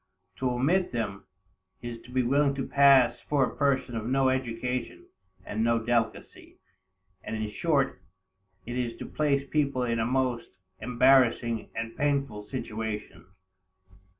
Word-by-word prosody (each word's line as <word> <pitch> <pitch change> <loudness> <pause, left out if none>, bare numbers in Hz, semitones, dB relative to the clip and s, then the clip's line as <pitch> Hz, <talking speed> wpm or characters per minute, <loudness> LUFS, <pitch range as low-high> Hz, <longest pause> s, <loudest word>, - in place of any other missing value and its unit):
To 130 - 0
omit 150 +10 +1
them, 105 -5 -4 0.6
is 120 -1 -6
to - - -14
be 130 0 +1
willing 140 +3 +2
to 135 - -3
pass 140 -3 +5
for 145 -2 +3
a - - -7
person 135 -4 0
of 110 0 -3
no 135 +1 +3
education, 125 -1 -3 0.4
and 110 +1 -2
no 115 0 +3
delicacy, 115 -1 -2 0.7
and 110 - -4
in 110 -1 -3
short 140 +1 0 0.6
it 120 - -5
is 120 -2 -3
to - - -7
place 140 -2 0
people 140 -3 0
in 115 -1 -1
a 115 - +1
most 125 -2 0 0.3
embarrassing 125 -2 +3
and 115 0 -4
painful 140 -8 -1
situation. 110 -6 -5
125 Hz, 140 wpm, -28 LUFS, 115-135 Hz, 0.7 s, pass